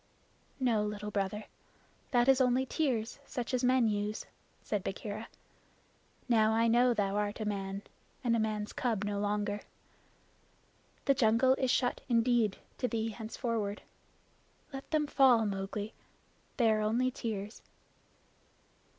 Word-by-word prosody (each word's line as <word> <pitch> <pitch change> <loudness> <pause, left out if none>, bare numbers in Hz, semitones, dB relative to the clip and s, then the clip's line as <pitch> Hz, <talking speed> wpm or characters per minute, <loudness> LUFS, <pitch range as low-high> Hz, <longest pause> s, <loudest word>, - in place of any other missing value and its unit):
"No, 240 -5 +2
Little 210 0 -4
Brother. 200 +1 -1 0.7
That 245 -2 +3
is 270 0 +5
only 255 +1 +3
tears 250 -5 -1
such 245 -1 -4
as 255 0 +1
men 250 -2 +4
use," 210 0 -2 0.4
said 205 -3 -2
Bagheera. 210 +3 -5 1.0
"Now 220 -3 +4
I 230 +1 +3
know 240 +2 +5
thou 200 -1 0
art 205 +1 -1
a 215 - -2
man, 195 -1 -3 0.4
and 235 -2 +2
a - - +1
man's 215 -1 -2
cub 225 -5 -1
no 205 -1 -2
longer. 205 0 -1 1.4
The 275 - +5
jungle 245 +1 +4
is 265 -1 0
shut 245 0 +1
indeed 230 -3 +3 0.2
to 250 - +1
thee 225 -2 -1
henceforward. 220 -2 -3 0.9
Let 270 0 -7
them 310 -2 +2
fall, 260 -6 +5
Mowgli. 200 +1 -3 0.6
They 230 -4 +4
are 215 0 +2
only 235 +4 +1
tears." 215 -3 -5
225 Hz, 135 wpm, -32 LUFS, 210-245 Hz, 1.4 s, is